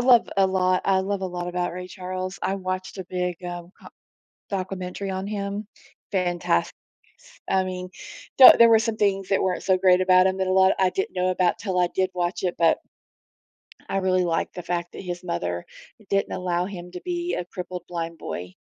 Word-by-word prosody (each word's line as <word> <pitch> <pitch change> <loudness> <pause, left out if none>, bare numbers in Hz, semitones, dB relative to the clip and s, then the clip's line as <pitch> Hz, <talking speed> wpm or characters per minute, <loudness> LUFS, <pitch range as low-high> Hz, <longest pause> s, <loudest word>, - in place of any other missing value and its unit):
love 245 -2 +5
a 195 -1 +5
lot 185 -1 +1
I 190 -1 +3
love 195 +1 -2
a - - 0
lot 175 0 -4
about 175 -1 -2
Ray 180 0 -7
Charles, 185 0 -5
I 195 - 0
watched 185 0 -4
a 185 - -4
big, 180 -1 -2
uh, 175 -1 -5 0.2
co - - -12 0.6
documentary 190 0 -4
on 190 +1 -3
him. 200 0 -4 0.5
Fantas 175 - +1 0.8
I 190 0 +3
mean, 185 0 -5 0.5
there 260 - +12
there 235 0 +8
were 225 - +7
some 225 -1 -1
things 195 -2 +1
that 195 - +2
weren't 185 -1 -1
so 190 -1 +3
great 185 -1 +5
about 185 0 +5
him 190 0 0
that 190 0 0
a - - +1
lot 190 0 +5
I 185 -1 +3
didn't 190 +1 -3
know 180 0 +1
about 180 -1 +1
'til 190 -4 -2
I 175 - +3
did 185 0 0
watch 175 +1 -2
it, 180 - -1
but 165 -1 +3 1.1
I 195 - 0
really 185 -1 +2
liked 165 -1 -1
the 180 - -6
fact 175 0 -3
that - - -7
his 180 -1 -5
mother 90 - -3 0.4
didn't 195 0 +1
allow 180 -1 -1
him 180 -2 -8
to 180 - -8
be 350 0 -3
a 175 - -3
crippled 180 -1 -7
blind 170 -1 -4
boy. 90 - -6
185 Hz, 200 wpm, -24 LUFS, 180-190 Hz, 1.1 s, there